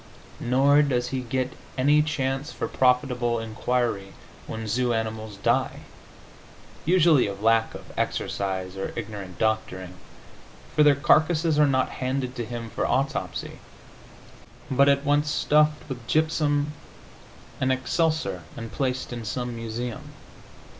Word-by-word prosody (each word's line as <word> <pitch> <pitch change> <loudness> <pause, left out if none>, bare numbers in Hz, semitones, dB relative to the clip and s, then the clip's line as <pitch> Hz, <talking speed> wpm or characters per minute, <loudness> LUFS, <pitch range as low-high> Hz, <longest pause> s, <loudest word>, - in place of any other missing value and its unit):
Nor 135 +4 +4
does 125 -4 0
he 130 0 -2
get 130 +1 -2 0.2
any 145 +3 +4
chance 140 -1 -2
for - - -3
profitable 125 -2 +2
inquiry 115 -2 -1 0.3
when 110 0 -5
zoo 120 +3 +1
animals 110 -2 -4
die 120 +6 0 1.0
(usually 165 - +5
of 100 +1 -6
lack 115 0 +3
of - - -10
exercise 95 -1 -2
or 95 - -4
ignorant 100 -5 -6
doctoring), 110 -4 -1 0.8
for 150 - +4
their 145 -1 +6
carcasses 155 +2 +3
are 150 - +6
not 130 -1 +2
handed 130 0 -3
to 120 - -2
him 115 -1 -6
for - - -1
autopsy, 135 +3 -2 1.1
but 140 +2 +5
at 140 +1 +2
once 145 +1 +2
stuffed 150 0 +2
with 125 -3 -7
gypsum 150 -2 +1 0.9
and 130 0 +2
excelsior 130 - 0 0.2
and 115 -1 -6
placed 130 -2 -2
in 120 -1 -5
some 120 +2 -3
museum. 115 +1 -5
125 Hz, 125 wpm, -25 LUFS, 115-145 Hz, 1.1 s, their